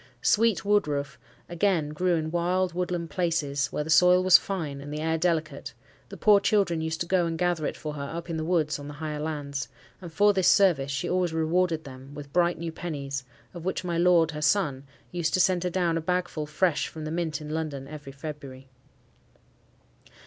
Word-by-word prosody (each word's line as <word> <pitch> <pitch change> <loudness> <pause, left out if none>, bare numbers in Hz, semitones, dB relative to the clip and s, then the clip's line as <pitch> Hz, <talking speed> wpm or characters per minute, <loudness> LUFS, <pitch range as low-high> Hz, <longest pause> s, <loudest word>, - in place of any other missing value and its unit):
Sweet 225 -2 +3
woodroof, 150 -8 0 0.3
again, 175 -3 0
grew 175 +4 +1
in 160 -1 -2
wild, 175 +1 0
woodland 175 -2 -3
places 145 -6 0
where 150 - -3
the 160 - -4
soil 180 +3 +6
was 185 -1 +6
fine 155 -8 +1
and 145 +1 -8
the 150 - -4
air 160 +1 0
delicate: 165 -1 -1 0.3
the - - -9
poor 210 -2 +5
children 200 -5 +1
used 160 0 -3
to - - 0
go 175 -1 +2
and 165 0 -3
gather 175 -3 0
it - - -5
for 150 -1 -5
her 140 -1 -5
up 170 +1 -6
in 165 - -3
the 160 - -2
woods 160 -3 0
on 145 - -8
the 145 - -8
higher 150 0 -4
lands; 145 -4 -4 0.3
and 175 -3 -8
for 205 +4 +4
this 190 -2 +2
service 170 -9 +4
she 140 +5 -2
always 180 -2 0
rewarded 160 0 +1
them 135 +1 -11
with 140 0 -9
bright 175 0 +2
new 165 0 -4
pennies, 140 -5 -5 0.3
of 175 -2 -8
which 185 +1 -2
my 170 -2 -1
lord, 170 -2 +4
her 150 -1 -6
son, 150 -5 +1 0.3
used 170 -3 0
to - - +1
send 185 -1 +3
her 180 - 0
down 170 -2 0
a - - -5
bagful 175 -3 -2
fresh 155 +1 +1
from 155 -1 -8
the 155 - -4
Mint 160 -3 -2
in 150 0 -7
London 150 -4 -4
every 145 -2 -9
February. 140 -2 -9
160 Hz, 205 wpm, -27 LUFS, 150-180 Hz, 0.3 s, soil